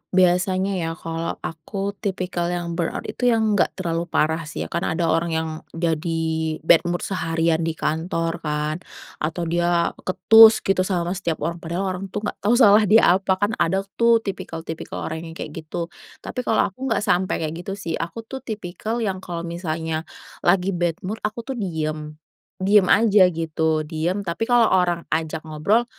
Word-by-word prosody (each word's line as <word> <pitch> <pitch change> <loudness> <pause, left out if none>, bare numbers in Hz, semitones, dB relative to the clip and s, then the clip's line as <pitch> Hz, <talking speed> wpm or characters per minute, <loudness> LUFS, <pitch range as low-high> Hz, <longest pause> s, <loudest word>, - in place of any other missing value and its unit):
Biasanya 185 +1 +3
ya 165 -1 -2
kalau 165 0 -4
aku 195 +5 -4
tipikal 185 -4 -2
yang 175 -1 -3
burnout 165 - -2
itu 245 - -1
yang 220 -2 +3
nggak - - +1
terlalu 170 -2 -2
parah 160 0 +1
sih - - -4
ya, - - -9
karena 170 -1 -1
ada 165 -1 +1
orang 165 0 +1
yang 160 0 -1 0.3
jadi 165 0 -1 0.5
bad 165 0 +6
mood 175 0 -2
seharian 165 -2 0
di 165 -1 -1
kantor 165 +1 -2
kan, 150 +1 -2 0.4
atau 160 +3 -2
dia 170 0 +1 0.2
ketus 220 +5 +7
gitu 195 -1 +1
sama 175 -2 -1
setiap 170 -5 -3
orang 170 +1 -2
padahal 170 +4 -3
orang 185 +1 -5
tuh 210 +3 -5
nggak - - -4
tau 220 +4 +2
salah 210 -3 +6
dia 220 +3 +6 0.2
apa, 190 -1 +1
kan 205 +3 0
ada 190 +3 +1 0.2
tuh 235 -1 +5
tipikal-tipikal 165 -4 -5
orang 160 +1 -5
yang 165 - -10
kayak 155 - -6
gitu. 165 +2 -5 0.3
Tapi 255 - -5
kalau 225 -5 +1
aku 265 +7 -6
nggak 225 -4 0
sampai 185 -1 +1
kayak 155 - -2
gitu 195 - -3
sih, 170 -5 -4
aku 170 +7 -5
tuh 265 +4 -7
tipikal 220 +2 -4
yang 190 -3 -1
kalau 170 -2 -5
misalnya 160 -2 -3 0.3
lagi 185 +2 +2
bad 175 -2 0
mood, 210 +4 -4
aku 215 +2 -3
tuh - - -3
diam. 155 -4 -3 0.4
Diam 195 0 +4
aja 205 -4 +6
gitu 160 -1 -1
diam, 175 +5 -2
tapi 200 +8 -2
kalau 240 -2 +5
orang 175 -2 +2
ajak 160 0 -2
ngobrol 195 +10 +1
175 Hz, 180 wpm, -22 LUFS, 165-195 Hz, 0.5 s, ketus